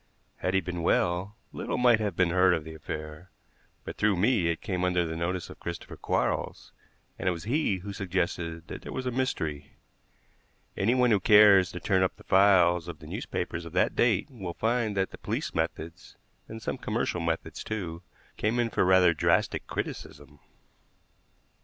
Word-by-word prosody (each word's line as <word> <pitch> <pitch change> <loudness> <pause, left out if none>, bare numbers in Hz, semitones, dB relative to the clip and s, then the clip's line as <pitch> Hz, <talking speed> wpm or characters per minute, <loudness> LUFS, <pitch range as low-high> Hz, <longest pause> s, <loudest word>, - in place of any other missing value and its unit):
Had 90 +1 -1
he 95 - +3
been 90 0 -5
well, 90 +4 +1 0.2
little - - -3
might 120 -3 +5
have 105 -5 -2
been 90 -1 +2
heard 90 0 +4
of 80 - -4
the 80 +1 -9
affair; 75 +2 -7 0.5
but - - -7
through 105 -2 +2
me 105 -1 +2
it 85 -1 -1
came 95 -6 -3
under 90 -1 +1
the 80 0 -4
notice 85 +2 -2
of - - -13
Christopher 85 0 -7
Quarles, - - -2 0.5
and 95 - +1
it - - +2
was 85 -2 -5
he 125 - +1
who 100 +2 -7
suggested 85 -3 -3
that - - -7
there - - -8
was 130 - -4
a 125 - -1
mystery. 80 - -3 1.0
Anyone 125 +4 +2
who 105 - +4
cares 100 -2 +6
to 90 - -6
turn 95 +1 +1
up 95 - +1
the - - -17
files 90 -3 +4
of 85 -3 -7
the 75 - -14
newspapers 85 +2 -4
of 85 - -10
that - - +1
date 120 -2 +2
will 95 -9 -7
find 115 -2 0
that 95 0 0
the - - -11
police - - -3
methods, 80 +1 -4 0.3
and 110 0 -9
some - - -3
commercial 90 - -2
methods, 85 0 -3
too, 90 -6 -5 0.4
came 110 +3 0
in 120 -1 0
for - - +2
rather 90 -2 +5
drastic 75 - +1
criticism. 75 +1 -6
Dr. - - -32
90 Hz, 185 wpm, -28 LUFS, 85-105 Hz, 1.0 s, cares